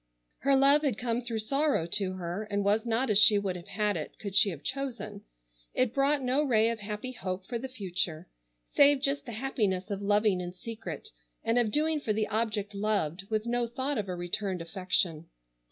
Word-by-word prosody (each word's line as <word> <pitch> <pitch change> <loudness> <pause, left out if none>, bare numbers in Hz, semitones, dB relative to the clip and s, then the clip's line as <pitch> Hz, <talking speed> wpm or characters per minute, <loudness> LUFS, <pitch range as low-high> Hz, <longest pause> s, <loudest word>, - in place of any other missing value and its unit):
Her 275 0 +3
love 275 +2 +5
had 275 -8 0
come 240 -1 -1
through 235 -2 -3
sorrow 275 - +1
to 185 +2 +1
her, 185 +3 -4
and 205 0 0
was 215 +3 +2
not 230 +1 +1
as 205 - +6
she 210 0 +7
would 195 -2 -1
have 175 -1 -9
had 210 0 0
it 155 -3 -6
could 200 -2 -6
she 200 - +6
have 160 -6 -7
chosen. 235 -7 -4 0.5
It 255 -2 +2
brought 275 0 +2
no 260 +4 +2
ray 230 -5 +3
of 230 - -5
happy 210 +4 -5
hope 185 -6 -5
for 235 +1 -4
the 265 - -5
future, 185 -8 -3 0.4
save 285 -1 +5
just 275 -1 +1
the - - -5
happiness 210 -6 -1
of 200 0 -3
loving 205 -2 +2
in 175 0 -6
secret, 225 - -7 0.3
and 230 +1 +2
of 235 -3 +2
doing 310 +4 +2
for 215 - 0
the 215 0 0
object 210 -2 -1
loved, 200 -3 -1
with 215 0 -1
no 240 0 0
thought 260 +2 -2
of 200 -2 -4
a 180 - -2
returned 180 +2 -3
affection. 170 -2 -1
215 Hz, 200 wpm, -29 LUFS, 195-250 Hz, 0.5 s, she